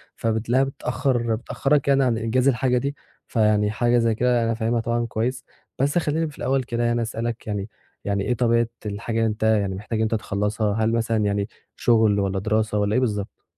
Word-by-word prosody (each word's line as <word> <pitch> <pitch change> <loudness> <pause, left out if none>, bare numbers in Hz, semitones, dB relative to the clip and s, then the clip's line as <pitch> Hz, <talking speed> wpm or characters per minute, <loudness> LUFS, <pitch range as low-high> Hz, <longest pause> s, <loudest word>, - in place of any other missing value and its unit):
فبتلاقيها 115 +3 +1
بتأخّر 125 -3 -1
بتأخَّرَك، 135 +5 0
يعني، 140 -1 +4
عن 120 -3 +1
إنجاز 120 +4 +1
الحاجة 125 -1 +2
دي. 140 +3 -2 0.3
فيعني 105 -2 +2
حاجة 120 +2 +2
زي 115 -1 +2
كده 120 +1 +2
أنا 115 0 +1
فاهمها 115 +1 0
طبعًا 120 +1 -1
كويس، 125 +3 -2 0.4
بس 140 +4 +1
خلِّيني 160 0 0
في 150 - -14
الأول 135 0 0
كده 120 -1 -2
يعني 120 0 +1
أسألك 115 0 -4
يعني 105 0 -3 0.4
يعني 100 -1 0
إيه 125 - +1
طبيعة 115 -1 +2 0.2
الحاجة 105 +2 -3
اللي 115 - +3
أنت 110 0 -3
يعني 105 -3 +2
محتاج 105 +3 -4
إن 110 - +2
أنت 110 +1 0
تخلِّصها؟ 105 0 -1
هل 110 - +2
مثلًا 115 -2 +1
يعنى 100 0 0 0.3
شُغل، 110 -3 +3
والّا 100 -1 0
دراسة، 110 +1 0
والّا 105 0 +1
إيه 125 - +3
بالضبط؟ 105 -5 -3
115 Hz, 195 wpm, -23 LUFS, 105-125 Hz, 0.4 s, يعني